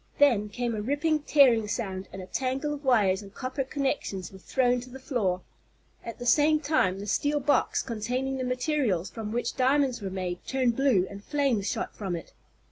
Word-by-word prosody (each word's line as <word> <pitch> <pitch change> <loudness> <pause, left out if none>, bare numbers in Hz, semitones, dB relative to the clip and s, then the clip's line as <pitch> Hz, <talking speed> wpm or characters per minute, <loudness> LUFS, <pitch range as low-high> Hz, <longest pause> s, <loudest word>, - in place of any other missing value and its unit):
Then 235 -8 +4
came 240 +2 -2
a 215 - -2
ripping, 295 +6 +1
tearing 260 -7 +4
sound, 195 -4 -3
and 190 - -7
a - - -8
tangle 265 +7 -2
of 295 0 -7
wires 210 -7 +3
and 200 -1 -12
copper 260 +5 -3
connections 265 - -2
were 190 - -12
thrown 250 +4 +1
to 250 - -11
the 260 - -9
floor. 215 -9 -1 0.6
At 230 - -7
the 245 - -7
same 300 +4 +4
time 285 -12 +1
the 200 - -6
steel 290 +8 +1
box, 285 +1 +2
containing 250 +3 -2
the 260 - -2
materials 250 - 0
from 220 -2 -5
which 235 +1 -2
diamonds 265 -1 +2
were 195 - -3
made, 185 -2 -4
turned 255 -3 +1
blue, 255 -9 +3
and 200 +1 -10
flames 270 -8 0
shot - - -3
from 190 -4 -3
it. 165 - -9
245 Hz, 195 wpm, -28 LUFS, 200-275 Hz, 0.6 s, Then